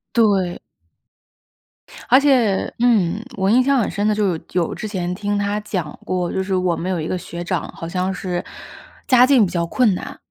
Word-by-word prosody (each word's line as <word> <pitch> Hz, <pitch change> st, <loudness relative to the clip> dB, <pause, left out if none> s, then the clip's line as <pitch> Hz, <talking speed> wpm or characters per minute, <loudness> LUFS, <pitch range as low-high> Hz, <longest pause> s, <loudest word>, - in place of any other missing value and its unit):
对。 195 Hz, -6 st, +2 dB, 1.5 s
而 255 Hz, -, +7 dB
且， 250 Hz, -9 st, +2 dB
嗯， 220 Hz, -4 st, +2 dB
我 190 Hz, 0 st, +1 dB
印 245 Hz, +4 st, +5 dB
象 275 Hz, 0 st, +2 dB
很 225 Hz, -, 0 dB
深 205 Hz, +3 st, -1 dB
的 215 Hz, -, +3 dB
就 205 Hz, -3 st, +1 dB
是 160 Hz, -, -6 dB
有 180 Hz, -1 st, +1 dB
有 -, -, -5 dB
之 215 Hz, -, -5 dB
前 180 Hz, -4 st, -3 dB
听 205 Hz, +2 st, -2 dB
她 205 Hz, +1 st, -1 dB
讲 185 Hz, -7 st, -4 dB
过， 180 Hz, -1 st, -1 dB
就 190 Hz, -, -1 dB
是 190 Hz, 0 st, -1 dB
我 180 Hz, -2 st, +1 dB
们 175 Hz, +3 st, -4 dB
有 185 Hz, -2 st, -1 dB
一 155 Hz, -, -3 dB
个 185 Hz, -, -2 dB
学 175 Hz, 0 st, -7 dB
长， 175 Hz, -, -2 dB
好 165 Hz, -, -6 dB
像 185 Hz, +2 st, -2 dB
是 180 Hz, -1 st, -3 dB, 0.6 s
家 250 Hz, -1 st, +6 dB
境 255 Hz, -5 st, +5 dB
比 175 Hz, -, -5 dB
较 170 Hz, -1 st, -1 dB
困 230 Hz, +2 st, +2 dB
难， -, -, -6 dB
190 Hz, 220 characters per minute, -20 LUFS, 180-215 Hz, 1.5 s, 而